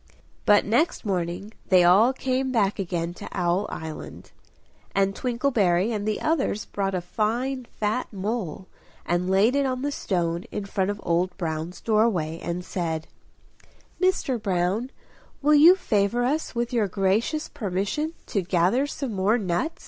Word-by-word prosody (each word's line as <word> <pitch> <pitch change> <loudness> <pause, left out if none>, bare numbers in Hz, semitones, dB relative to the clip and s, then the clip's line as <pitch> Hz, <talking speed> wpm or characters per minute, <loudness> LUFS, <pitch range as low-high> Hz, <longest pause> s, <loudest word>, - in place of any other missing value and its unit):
But 205 0 +6
next 245 - +1
morning 185 +2 -2 0.2
they 185 -2 +6
all 195 +8 +6
came 260 0 -1
back 210 -4 +1
again 175 -2 -2
to - - -9
Owl 180 +1 0
Island; 160 -1 -8 0.6
and 195 0 +2
Twinkleberry 230 -6 +1
and 210 -2 -2
the 215 - 0
others 295 -9 0
brought 195 -1 -2
a 180 - -1
fine 240 +7 -1
fat 215 +2 -2
mole, 200 -3 -3 0.4
and 175 +1 0
laid 200 +7 +4
it 280 -1 +2
on 255 0 -2
the 290 - 0
stone 175 -8 -1
in 205 - -4
front 195 -1 -1
of 205 0 -3
Old 175 +2 0
Brown's 165 0 -4
doorway, 210 -8 +1
and 175 +1 -4
said 160 -3 -3 0.9
"Mr. 320 - +1
Brown, 195 +5 0 0.5
will 295 +2 +3
you 320 +5 +8
favour 215 - +1
us 295 +1 -1
with 240 +1 -2
your 225 -4 +2
gracious 205 - 0
permission 205 - -2
to 200 - -1
gather 185 +9 +2
some 275 -5 -4
more 200 +4 +2
nuts?" 210 - -2
205 Hz, 150 wpm, -25 LUFS, 180-245 Hz, 0.9 s, you